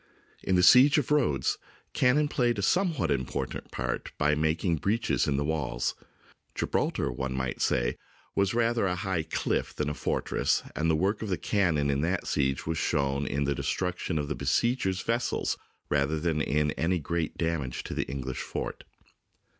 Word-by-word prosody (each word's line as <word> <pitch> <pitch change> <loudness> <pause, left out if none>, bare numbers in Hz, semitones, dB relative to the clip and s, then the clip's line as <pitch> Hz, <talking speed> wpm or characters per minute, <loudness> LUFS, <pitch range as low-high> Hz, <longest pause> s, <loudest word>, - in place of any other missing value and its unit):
In 95 - +1
the 90 - +4
siege 125 - +8
of 150 -2 0
Rhodes, 125 - +2 0.3
cannon 140 +4 +3
played 120 -5 +1
a 100 - -2
somewhat 165 - +1
important 65 -1 -3
part - - -3
by 75 0 +3
making 80 +3 +1
breaches 105 +9 0
in 70 -2 +1
the 70 - +1
walls. 65 -6 -1 0.6
Gibraltar, - - 0
one 65 +2 -3
might 65 -1 -3
say, - - +1 0.4
was 100 +1 +1
rather 115 -3 +2
a 90 - 0
high 95 -3 -1
cliff 80 - -2
than 75 -1 -1
a - - -2
fortress, - - 0
and 80 +1 +1
the 80 - +4
work 95 +6 0
of 110 - -3
the 90 - 0
cannon 80 -6 +1
in 70 0 0
that 90 +4 0
siege 65 -1 0
was 80 0 -1
shown 70 -3 0
in 70 +2 0
the 70 0 +1
destruction 90 +2 -2
of 75 -1 -1
the 75 - -1
besiegers' 95 - 0
vessels 115 +1 0 0.3
rather 75 +2 +1
than 80 -1 0
in 75 +1 +1
any 90 +5 0
great 80 0 -2
damage 80 -7 -2
to - - -6
the - - -1
English 65 -2 -4
fort. - - -5
80 Hz, 175 wpm, -28 LUFS, 70-100 Hz, 0.6 s, siege